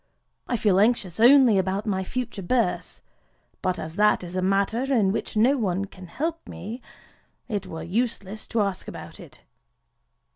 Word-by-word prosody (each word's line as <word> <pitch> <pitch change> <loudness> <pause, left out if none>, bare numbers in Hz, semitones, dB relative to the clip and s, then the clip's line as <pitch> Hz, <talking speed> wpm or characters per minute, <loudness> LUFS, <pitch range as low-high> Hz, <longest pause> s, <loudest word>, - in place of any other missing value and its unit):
I 245 - 0
feel 200 -4 +3
anxious 205 -5 +1
only 245 -3 +7
about 190 +2 -1
my 190 -3 -1
future 240 0 -4
birth; 230 +6 -1 0.6
but 185 0 0
as 160 +3 -7
that 210 -2 +3
is 175 +1 -7
a 185 - 0
matter 200 +8 +1
in 210 -7 +3
which 215 - -3
no 255 +6 +4
one 195 -2 0
can 185 -2 -12
help 325 - -4
me, 230 +6 -7 0.7
it 205 -5 -3
were 160 0 -6
useless 210 +1 -3
to 225 -3 +1
ask 195 -2 -3
about - - -9
it. - - -14
205 Hz, 160 wpm, -25 LUFS, 190-235 Hz, 0.7 s, only